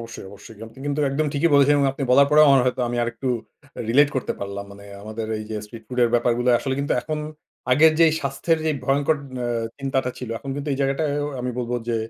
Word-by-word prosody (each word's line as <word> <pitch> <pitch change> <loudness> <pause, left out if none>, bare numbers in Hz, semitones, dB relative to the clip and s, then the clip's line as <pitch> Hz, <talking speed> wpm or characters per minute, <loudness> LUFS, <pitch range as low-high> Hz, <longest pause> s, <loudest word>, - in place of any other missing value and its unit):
অবশ্যই, 115 -4 -9
অবশ্যই। 100 +2 -13
আপনি 115 +2 -11
কিন্তু 145 +1 -1
একদম 150 +3 0
ঠিকই 160 +4 +1
বলেছেন। 140 +1 +5
এবং 140 - +3
আপনি 140 - -6
বলার 140 +2 +6
পরেও 150 0 +7
আমার 135 -1 +6
হয়তো 125 0 0
আমি 120 - -3
আরেকটু 120 +3 -3 0.6
রিলেট 140 +5 +5
করতে 130 - -2
পারলাম। 100 0 -5
মানে 100 0 -13 0.2
আমাদের 110 +1 -5
এইযে 110 0 -6
স্ট্রিট 110 +2 -11
ফুডের 125 -2 +2
ব্যাপারগুলা, 120 +1 +2
আসলে 135 -1 -2
কিন্তু 140 - -1
এখন 155 +4 -4 0.5
আগের 155 +4 +6
যে 165 - +8
স্বাস্থ্যের 140 +4 0
যেই 155 -2 0
ভয়ংকর 140 +3 +2 0.3
আ - - -1 0.3
চিন্তাটা 135 -2 -1
ছিল, 125 - -6
এখন 135 - -7
কিন্তু 145 +1 -5
এই 135 - -3
জায়গাটা 135 +3 0
আ - - -2 0.2
আমি 125 0 -2
বলব 120 -1 -3 0.2
যে 115 - +1
130 Hz, 215 wpm, -23 LUFS, 115-140 Hz, 0.6 s, যে